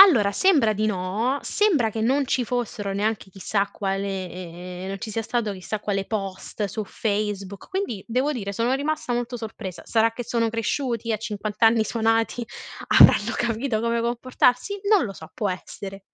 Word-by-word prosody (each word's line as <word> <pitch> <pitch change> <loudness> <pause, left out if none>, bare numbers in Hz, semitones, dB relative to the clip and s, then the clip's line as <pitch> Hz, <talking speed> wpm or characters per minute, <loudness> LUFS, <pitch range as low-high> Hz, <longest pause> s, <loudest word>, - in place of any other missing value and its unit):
Allora 245 - +8
sembra 280 - +4
di 215 +1 0
no. 210 +7 0
Sembra 315 - +2
che 220 - -4
non 265 +6 +2
ci 250 -1 +1
fossero 225 -4 -2
neanche 205 0 -1
chissà 200 +1 -1
quale 185 -2 -4
non 195 +1 -4
ci 220 - -5
sia 225 +2 -2
stato 220 -2 -1
chissà 195 +3 -5
quale 195 -2 -1
post 195 -1 -4
su 210 +2 -4
Facebook, 200 -2 -3
quindi 375 - -3
devo 255 +5 +1
dire 200 -7 -4
sono 230 +5 +1
rimasta 295 -1 -1
molto 245 +1 -2
sorpresa. 220 -5 -7
Sarà 225 0 +3
che 245 - -5
sono 230 0 +1
cresciuti 230 +1 -1
a - - +1
50 210 0 -5
anni 225 0 +6
suonati. 225 +1 +1 0.6
Avranno - - +7
capito 230 0 0
come 235 0 +1
comportarsi? 250 - +1
Non 420 - +5
lo 200 - -4
so. 160 -4 -11
Può 205 -3 0
essere. 195 +1 -7
220 Hz, 165 wpm, -24 LUFS, 200-240 Hz, 0.6 s, Allora